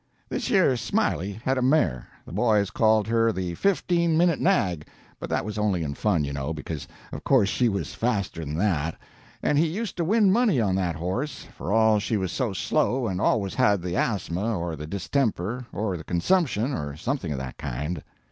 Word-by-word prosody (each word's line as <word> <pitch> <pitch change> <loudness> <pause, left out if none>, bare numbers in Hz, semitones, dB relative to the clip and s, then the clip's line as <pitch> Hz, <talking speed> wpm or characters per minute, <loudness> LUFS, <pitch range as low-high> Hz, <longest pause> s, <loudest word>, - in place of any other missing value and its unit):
"Thish - - -2
yer 190 - +4
Smiley 100 -3 0
had 130 0 +2
a - - -1
mare 130 - +2 0.2
the - - -11
boys 105 0 +2
called 110 -2 +3
her 115 0 +3
the 90 -3 -3
fifteen 170 - +1
minute 170 -1 +3
nag, 90 - +1 0.3
but - - -6
that - - 0
was 105 0 -4
only 100 -5 +1
in 70 -2 -3
fun, 90 0 +1
you 70 0 -3
know, 70 +3 -3
because 75 -1 -6 0.2
of - - -7
course 125 -8 +4
she 120 +2 +2
was 100 -2 -3
faster 100 -8 -1
than 75 0 -4
that 85 -5 0 0.5
and 145 - +3
he 165 - +3
used 200 +5 -4
to 170 - 0
win 205 +2 +4
money 215 - +3
on 100 -5 +1
that 90 -3 0
horse, 95 - -3
for 90 - -5
all 110 -1 +4
she 110 +2 -1
was 95 -3 -2
so 120 +2 -1
slow 120 +6 0
and 95 -4 -2
always 100 -4 +1
had 105 -8 +2
the 90 -1 -3
asthma, 105 0 -1
or 85 -1 -3
the 75 0 -7
distemper, 110 - -1
or 100 -2 -2
the 80 - -9
consumption, 130 - +1
or 75 - -4
something 120 - -2
of 70 - -2
that 65 -1 -6
kind. 75 +5 -3
105 Hz, 200 wpm, -25 LUFS, 85-130 Hz, 0.5 s, yer